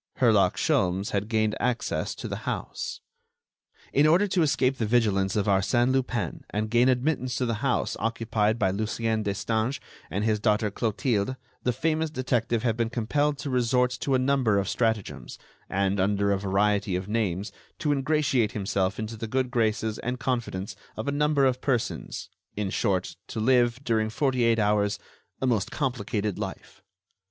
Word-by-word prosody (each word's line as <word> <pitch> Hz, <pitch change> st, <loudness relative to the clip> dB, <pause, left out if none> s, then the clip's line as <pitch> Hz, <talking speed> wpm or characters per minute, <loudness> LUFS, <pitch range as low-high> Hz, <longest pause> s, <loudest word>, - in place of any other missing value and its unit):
Herlock -, -, +4 dB
Sholmes 95 Hz, +2 st, +1 dB
had 100 Hz, 0 st, -1 dB
gained 110 Hz, -1 st, +1 dB
access 125 Hz, -1 st, -1 dB
to -, -, -6 dB
the -, -, -4 dB
house. 480 Hz, -1 st, -4 dB, 0.9 s
In 145 Hz, +2 st, +5 dB
order 180 Hz, +6 st, +4 dB
to 185 Hz, -1 st, +2 dB
escape 135 Hz, -3 st, +2 dB
the 110 Hz, -, 0 dB
vigilance 105 Hz, -5 st, +2 dB
of 105 Hz, -2 st, +1 dB
Arsène 115 Hz, +6 st, +2 dB
Lupin 130 Hz, -2 st, -1 dB
and 105 Hz, +1 st, -2 dB
gain 120 Hz, +2 st, +4 dB
admittance 130 Hz, -1 st, 0 dB
to 125 Hz, -, 0 dB
the 115 Hz, -2 st, -2 dB
house 130 Hz, -2 st, 0 dB
occupied 115 Hz, -1 st, 0 dB
by 95 Hz, -5 st, +2 dB
Lucien 110 Hz, +2 st, -1 dB
Destange 110 Hz, +5 st, -1 dB, 0.3 s
and 100 Hz, +3 st, -2 dB
his 110 Hz, -1 st, +2 dB
daughter 105 Hz, -1 st, +1 dB
Clotilde, 110 Hz, +2 st, 0 dB, 0.3 s
the 125 Hz, -, +1 dB
famous 160 Hz, +5 st, 0 dB
detective 120 Hz, -5 st, 0 dB
had 115 Hz, -3 st, +1 dB
been 115 Hz, -1 st, 0 dB
compelled 145 Hz, +5 st, 0 dB
to 140 Hz, -, -4 dB
resort 125 Hz, 0 st, +2 dB
to 135 Hz, -, +1 dB
a -, -, +5 dB
number 130 Hz, -5 st, +2 dB
of 100 Hz, -, 0 dB
stratagems, 110 Hz, -4 st, -2 dB, 0.3 s
and, 100 Hz, +1 st, 0 dB
under 100 Hz, +1 st, +2 dB
a 100 Hz, -, +1 dB
variety 100 Hz, 0 st, +1 dB
of 90 Hz, +1 st, -3 dB
names, 105 Hz, -2 st, -1 dB, 0.3 s
to 150 Hz, -3 st, 0 dB
ingratiate 135 Hz, -5 st, +1 dB
himself 95 Hz, -1 st, -1 dB
into 110 Hz, +1 st, -4 dB
the 110 Hz, +1 st, -5 dB
good 130 Hz, +2 st, -1 dB
graces 110 Hz, -2 st, 0 dB
and 125 Hz, +1 st, -3 dB
confidence 115 Hz, -7 st, -2 dB, 0.2 s
of 110 Hz, -, -4 dB
a -, -, +1 dB
number 145 Hz, -1 st, +2 dB
of 130 Hz, -1 st, +1 dB
persons—in 110 Hz, -5 st, -3 dB
short, 95 Hz, -4 st, 0 dB
to 115 Hz, -, -5 dB
live, 120 Hz, 0 st, +3 dB
during 110 Hz, -3 st, +1 dB
forty 130 Hz, +1 st, +1 dB
eight 115 Hz, -1 st, +3 dB
hours, 105 Hz, -1 st, +2 dB, 0.4 s
a -, -, -1 dB
most 115 Hz, -6 st, +1 dB
complicated 110 Hz, -, -2 dB
life. -, -, -7 dB
115 Hz, 165 wpm, -27 LUFS, 105-130 Hz, 0.9 s, In